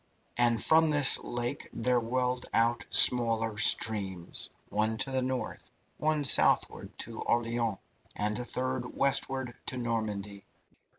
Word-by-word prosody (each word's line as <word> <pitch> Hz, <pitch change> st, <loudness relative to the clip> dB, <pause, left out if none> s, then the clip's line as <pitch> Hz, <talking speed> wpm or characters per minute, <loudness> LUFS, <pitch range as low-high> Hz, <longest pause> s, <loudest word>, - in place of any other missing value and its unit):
And 120 Hz, -2 st, +2 dB
from 160 Hz, 0 st, +4 dB
this 145 Hz, -2 st, +5 dB
lake 120 Hz, +3 st, -5 dB
there 125 Hz, +1 st, 0 dB
welled 125 Hz, +1 st, -3 dB
out 115 Hz, -1 st, 0 dB
smaller 115 Hz, -3 st, +4 dB
streams 95 Hz, -7 st, +2 dB, 0.2 s
one 110 Hz, +2 st, -1 dB
to 135 Hz, +2 st, -3 dB
the 130 Hz, 0 st, -1 dB
north, 130 Hz, 0 st, -5 dB, 0.3 s
one 155 Hz, -1 st, 0 dB
southward, -, -, +1 dB
to -, -, -8 dB
Orleans, 115 Hz, -3 st, -1 dB, 0.4 s
and 105 Hz, +2 st, -1 dB
a -, -, -3 dB
third 130 Hz, 0 st, -4 dB
westward 135 Hz, -2 st, 0 dB
to 130 Hz, -, -2 dB
Normandy. 105 Hz, -4 st, -4 dB
120 Hz, 125 wpm, -28 LUFS, 110-130 Hz, 0.4 s, this